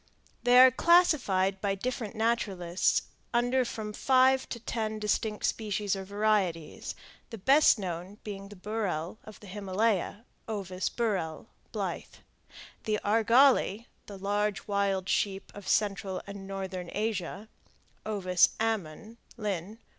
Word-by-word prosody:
They 245 0 +5
are 255 0 +9
classified 245 - +3
by 200 -1 0
different 235 0 -4
naturalists 200 -6 +1 0.3
under 245 +2 +3
from 220 -3 -5
five 260 +2 +3
to 235 - -5
ten 220 -2 -3
distinct 210 0 -1
species 205 -2 -1
or 195 - -5
varieties, 200 -5 -1 0.3
the 225 - -7
best 270 +8 +5
known 185 0 -5
being 200 -2 -7
the 205 - -11
burrhel 195 -3 -3
of 215 -2 -12
the - - -12
Himalaya 205 +2 -1 0.2
(Ovis 190 -4 -3
burrhel, 195 -9 -2 0.3
Blyth); - - -5 0.6
the 215 -1 0
argali, 230 +1 +4 0.2
the 200 - -8
large 205 +1 -1
wild 200 -2 0
sheep 195 -1 -1
of 205 - -10
central 195 -2 0
and 200 -1 -8
northeastern 190 -2 -5
Asia 210 -1 -3 0.6
(O. 205 -3 -4 0.3
ammon, 220 0 -3 0.2
Linn. 205 -1 -4
205 Hz, 125 wpm, -29 LUFS, 195-225 Hz, 0.6 s, are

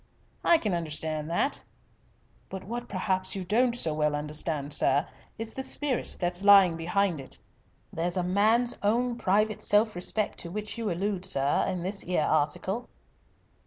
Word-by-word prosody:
"I 335 - +5
can 215 - -2
understand 155 -2 -3
that." 220 +12 -1 0.9
"But 190 -1 -7
what 240 +4 -6
perhaps 185 0 -1
you 190 - -4
don't 235 +6 +1
so 165 -10 0
well 150 -1 0
understand, 150 -1 -2
sir, - - +4 0.3
is 225 0 -4
the 265 - -4
spirit 265 0 -2
that's 175 +1 -1
lying 195 -4 +7
behind 175 +1 0
it. 135 - -8 0.6
There's 175 +3 -1
a 180 - 0
man's 220 +7 +2
own 235 +4 +1
private 215 +2 +1
self 210 0 +3
respect 200 +4 -1
to 170 - -4
which 210 +3 -4
you 225 -2 -2
allude, 190 +1 -2
sir, 140 -7 +2
in 185 -2 -3
this 195 +2 -2
'ere 180 -4 +1
article. 180 +9 -1
190 Hz, 160 wpm, -27 LUFS, 165-215 Hz, 0.9 s, lying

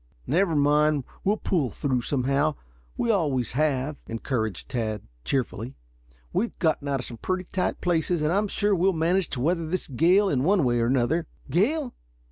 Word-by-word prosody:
"Never 165 +4 +2
mind; 150 0 +3 0.2
we'll 205 +3 +2
pull 155 - 0
through 130 +2 -1
somehow. 140 +4 +1 0.4
We 235 - +2
always 145 - 0
have," 145 0 0
encouraged 115 -3 -3
Tad 110 -5 -2 0.2
cheerfully. 125 - -2 0.6
"We've 235 - -1
gotten 155 -4 0
out 135 -2 0
of - - -6
some 120 - -8
pretty 185 +8 -2
tight 185 0 -2
places, 170 -1 +1
and 155 +3 +2
I 200 - +3
am 210 - 0
sure 205 +1 +1
we'll 190 +1 +3
manage 170 +3 +1
to 125 - -4
weather 165 +3 +1
this 185 +3 -2
gale 175 +9 +4
in 135 -8 +1
one 185 +1 +3
way 120 -2 +2
or 115 - +2
another." 135 +6 +1 0.2
"Gale? 245 - +1
155 Hz, 175 wpm, -26 LUFS, 130-180 Hz, 0.6 s, gale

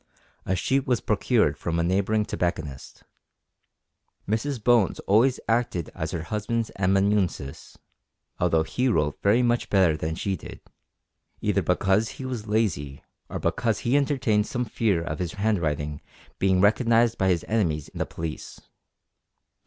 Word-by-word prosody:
A 95 - +1
sheet 135 +9 0
was 125 -3 +2
procured 105 - +1
from 85 -1 -2
a 85 - +1
neighbouring 100 +4 +1
tobacconist. 80 -8 -4 1.2
Mrs 120 +7 -1
Bones 120 -5 +3
always 115 +6 +3
acted 115 - 0
as - - -4
her 80 - -4
husband's 110 +3 -2
amanuensis 95 -6 0 0.6
(although 80 -2 +2
he 125 +10 -1
wrote 75 - 0
very 110 +5 +3
much 120 0 +1
better 95 -6 +4
than 80 +1 -3
she 95 +3 -2
did), 80 - -10 0.8
either - - +1
because 100 +3 +1
he 135 - -6
was 120 -4 -5
lazy, 85 -11 -1 0.3
or - - -4
because 115 -4 0
he 120 +3 +1
entertained 130 -7 +2
some 125 -1 -2
fear 105 -6 0
of 75 -2 -4
his 90 -2 -3
handwriting 80 -9 -1 0.4
being 95 -1 +3
recognised 115 +2 +3
by 95 - +2
his 90 -3 +1
enemies 85 -10 0
the - - -3
police! 80 -1 -6
100 Hz, 140 wpm, -25 LUFS, 85-115 Hz, 1.2 s, better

